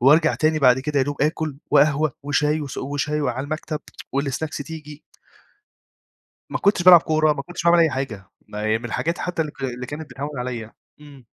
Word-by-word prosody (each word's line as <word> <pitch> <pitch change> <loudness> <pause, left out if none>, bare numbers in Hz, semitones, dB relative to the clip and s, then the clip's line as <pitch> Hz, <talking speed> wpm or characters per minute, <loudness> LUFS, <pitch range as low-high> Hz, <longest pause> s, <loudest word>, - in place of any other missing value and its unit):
وأرجع 145 +6 +5
تاني 155 0 +1
بعد 130 -3 +5
كده 145 +1 -1
يا 130 - +3
دوب 145 -1 -3
آكُل 155 -1 -1
وقهوة 150 -1 +3
وشاي 150 +2 +1
وس 140 -3 -6
وشاي 145 +2 -2
وعلى 130 -2 -2
المكتب 155 +1 -4 0.3
والسناكس 140 +3 -2
تيجي. 150 0 -9 1.5
ما - - -2
كنتش 200 -3 +2
بالعب 180 -1 +10
كورة، 155 -1 +2
ما 140 - -4
كنتش 170 +4 -7
باعمل 170 0 +5
أي 165 - +5
حاجة، 130 -8 -4 0.2
م 105 - -9
من 110 +2 -1
الحاجات 165 +8 -2
حتّى 175 -2 -2
اللي 150 -2 -3
ك 135 - -10
اللي 125 -1 -4
كانت 150 +2 -7
بتهوّن 140 +2 -6
عليّا. 120 -3 -5 0.3
إمم. 140 -4 -14
145 Hz, 185 wpm, -22 LUFS, 135-155 Hz, 1.5 s, بالعب